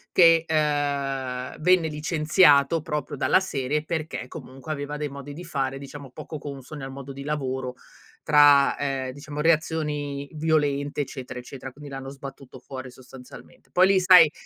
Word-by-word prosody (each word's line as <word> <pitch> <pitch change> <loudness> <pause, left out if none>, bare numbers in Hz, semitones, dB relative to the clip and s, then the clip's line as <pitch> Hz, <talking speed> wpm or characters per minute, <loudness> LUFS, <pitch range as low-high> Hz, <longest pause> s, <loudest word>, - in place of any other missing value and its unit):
che, 165 -2 +6
uhm, 140 -4 -1
venne 175 0 +4
licenziato 155 0 +3
proprio 150 -2 -4
dalla - - +4
serie 150 -5 -2
perché 160 -5 -4
comunque 135 +4 -9
aveva 145 0 -4
dei 150 -1 -3
modi 140 +1 -8
di 175 +5 -8
fare 135 -4 -2
diciamo 140 -1 -10
poco 155 - -7
consoni 140 0 -8
al 135 - -6
modo 140 0 -8
di 140 +1 -8
lavoro 130 -3 -3 0.5
tra, 145 -2 +6
ehm, 135 -2 -2
diciamo 145 +2 -6
reazioni 150 -3 0
violente, 150 -2 0
eccetera, 130 -3 -6
eccetera. 130 +1 -9
Quindi 145 +2 -11
l'hanno 135 0 -7
sbattuto 135 -2 -10
fuori 130 0 -8
sostanzialmente. 125 0 -14
Poi 185 +1 +5
lì 195 -1 +4
sai, 180 -4 +8
145 Hz, 150 wpm, -25 LUFS, 135-155 Hz, 0.5 s, sai